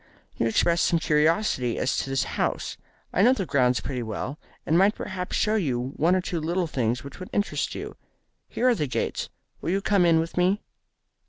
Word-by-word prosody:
"You 115 - 0
expressed 170 +9 +2
some 170 - +3
curiosity 150 - +1
as 125 - 0
to - - -2
this 135 -4 +1
house. - - -2 0.4
I - - +2
know 245 +5 +6
the 200 -7 -2
grounds 125 -5 +2
pretty 130 -3 -3
well, 120 +6 -4 0.3
and 160 - +1
might 195 +4 +4
perhaps 185 -2 -4
show 215 - +2
you 135 - -1
one 170 +4 +3
or 185 - +1
two 180 -2 -3
little 170 +3 0
things 125 -5 -1
which 140 -1 -10
would 185 - -8
interest 205 - -1
you. - - -6 0.5
Here 250 - 0
are 250 - +6
the 155 -10 -1
gates. 125 - -2 0.3
Will - - -3
you 195 +3 +2
come 200 -1 +2
in 165 -1 +5
with 165 +2 -3
me?" 185 +4 +2
165 Hz, 200 wpm, -26 LUFS, 130-190 Hz, 0.5 s, know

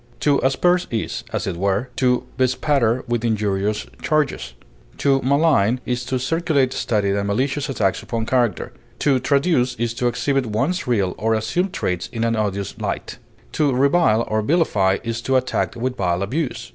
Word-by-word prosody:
To 145 -2 +3
asperse 175 +7 +2
is, 115 +1 -3
as - - -2
it 95 -4 -3
were, 100 +6 0
to 125 -1 +2
bespatter 130 -1 +1
with 120 -1 -1
injurious 105 -2 0 0.2
charges; 150 - -1 0.4
to 135 -1 +2
malign 135 -5 +3
is 125 0 -2
to 130 +1 -1
circulate 140 -1 +1
studied 100 -4 0
and 100 0 -1
malicious 135 +7 -1
attacks 105 -8 0
upon 115 -2 -3
character; 120 - 0 0.2
to 135 -3 +2
traduce 140 -3 +1
is 115 0 -2
to 120 +1 -1
exhibit 135 +1 0
one's 135 - -1
real 100 -7 +1
or 110 +1 +1
assumed 175 - -1
traits 90 - -2
in 115 -1 -3
an 115 0 +1
odious 100 -2 -2
light; - - -4 0.3
to 150 -2 +1
revile 140 -4 +3
or 110 0 0
vilify 105 - +2
is 115 0 -3
to 130 +2 0
attack 130 0 0
with 125 +2 -2
vile 90 0 0
abuse. 125 0 -3
125 Hz, 165 wpm, -21 LUFS, 110-140 Hz, 0.4 s, To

